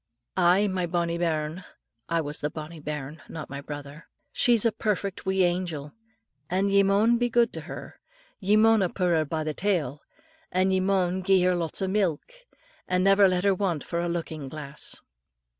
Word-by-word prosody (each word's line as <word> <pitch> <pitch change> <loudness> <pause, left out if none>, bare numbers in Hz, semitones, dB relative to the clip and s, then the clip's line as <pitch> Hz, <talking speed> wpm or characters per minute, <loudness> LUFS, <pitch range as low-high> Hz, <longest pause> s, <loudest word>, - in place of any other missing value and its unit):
"Aye, 185 +3 +4
my 185 -2 -1
bonnie 170 0 -1
bairn," 160 +1 -1 0.5
I 165 0 +1
was 150 -1 -4
the 150 - 0
bonnie 155 +1 -8
bairn, 150 0 -6
not 155 -4 -7
my 140 0 -5
brother, 145 +1 -9 0.3
"she's 235 -2 +3
a 230 - +4
perfect 200 -3 -2
wee 190 0 +3
angel, 175 -5 -1 0.6
and 195 +2 +1
ye 200 0 +6
maun 205 +4 +3
be 245 0 +1
good 235 0 +3
till - - -5
her; - - -9 0.4
ye 205 +1 +3
maunna 220 -4 +4
pu' 185 - -4
her 165 -3 +2
by 155 +1 -2
the 155 0 -2
tail, 160 -7 -1 0.5
and 185 +1 +2
ye 190 - +3
maun 185 -1 +1
gie 185 -1 +4
her 180 0 +3
lots 170 +1 -2
o' - - 0
milk, 190 - -1 0.5
and 180 0 +1
never 195 0 +6
let 180 0 0
her 200 -1 +4
want 180 -5 -1
for 170 - -3
a 175 0 -1
lookin' 160 -4 -4
glass." 150 0 -8
180 Hz, 185 wpm, -26 LUFS, 155-195 Hz, 0.6 s, ye